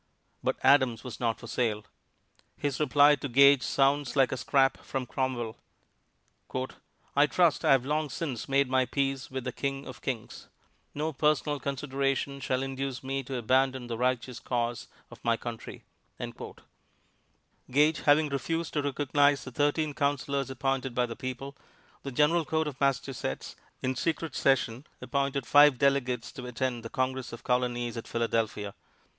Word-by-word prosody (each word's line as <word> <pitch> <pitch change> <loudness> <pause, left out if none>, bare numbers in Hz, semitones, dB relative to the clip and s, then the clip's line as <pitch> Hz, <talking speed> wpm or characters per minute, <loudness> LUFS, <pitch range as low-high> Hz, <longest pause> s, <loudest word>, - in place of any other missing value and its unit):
But - - 0
Adams 130 -5 +4
was 125 - -7
not 115 -2 0
for - - -10
sale. 110 -3 -1 0.7
His 145 -2 -2
reply 145 0 +5
to 140 - -5
Gage 140 +2 +6
sounds 140 +2 +1
like 135 -3 +4
a 130 - -2
scrap 135 +1 +2
from 135 -2 -4
Cromwell: 120 -3 -2 1.6
"I 145 +1 +5
trust 170 -1 +2
I - - +6
have 130 -2 +2
long 150 +1 0
since 135 -3 -4
made 140 0 +3
my 130 0 +2
peace 135 -1 -1
with 130 -1 -4
the 125 - -3
King 135 +2 -3
of - - -10
Kings. 120 -5 -5 0.5
No 155 +2 -2
personal 150 0 +1
consideration 140 0 -2
shall 130 0 -1
induce 135 -1 -4
me 135 +1 -2
to 130 0 -5
abandon 130 +2 +1
the 120 -1 -4
Righteous 125 0 -1
Cause 120 -1 -2 0.2
of - - -14
my 115 -1 +2
Country." 115 -1 -7 1.9
Gage 150 +3 +3
having 150 +1 +4
refused 165 +5 -2
to 150 - +1
recognize 145 0 +2
the 130 - -8
thirteen 145 +3 +1
Counselors 140 -1 -1
appointed 135 -1 -2
by 125 - +2
the 115 -1 -6
people, 130 +2 -6 0.5
the 140 - -6
General 150 +6 +3
Court 160 +1 0
of 145 -2 -7
Massachusetts, 135 - -1 0.3
in 130 0 0
secret 165 +2 -2
session, 130 -1 +1
appointed 140 +1 -1
five 145 0 +6
delegates 130 -3 +1
to 125 -5 -8
attend 125 0 -2
the 115 - -7
Congress 130 0 -2
of 115 - -9
Colonies 120 -1 0
at 115 - -6
Philadelphia. 115 -3 -1
135 Hz, 155 wpm, -29 LUFS, 125-140 Hz, 1.9 s, Gage